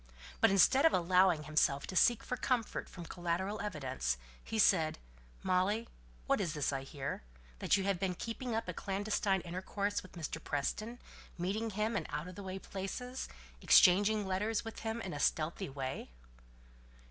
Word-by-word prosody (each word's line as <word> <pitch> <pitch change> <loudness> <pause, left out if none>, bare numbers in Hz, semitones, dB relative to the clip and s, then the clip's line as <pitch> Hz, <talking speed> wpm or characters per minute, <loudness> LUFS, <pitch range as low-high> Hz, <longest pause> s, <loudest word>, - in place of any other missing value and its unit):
But - - +6
instead 195 +8 +5
of 325 - +6
allowing 180 -2 +4
himself 150 -2 +2
to 185 - -7
seek 240 +4 +4
for 250 - -2
comfort 245 -2 -1
from 175 -2 -9
collateral 180 +5 -2
evidence, 130 - -2 0.3
he 225 - -4
said, 160 -6 +4 0.5
"Molly, 195 +5 +1 0.4
what - - +2
is 170 -5 -2
this 145 -1 0
I 135 - -2
hear? 135 0 -5 0.4
That - - +3
you 195 - -1
have 195 -2 0
been 185 -2 -1
keeping 230 +3 -4
up 225 - -2
a 180 - -3
clandestine 195 0 0
intercourse 190 +4 -2
with 185 - -15
Mr. 160 -2 -5
Preston 215 +11 -2 0.4
meeting 200 +6 -1
him 215 +2 -1
in - - -1
out 155 - -4
of 180 - -8
the 200 - -8
way 190 -1 -5
places; 225 +7 -5 0.3
exchanging 205 +3 +6
letters 205 +4 -1
with 225 - -6
him 225 +1 -3
in 190 - -5
a 145 - -4
stealthy 160 +5 0
way?" 135 -1 -5
190 Hz, 170 wpm, -34 LUFS, 170-215 Hz, 0.5 s, But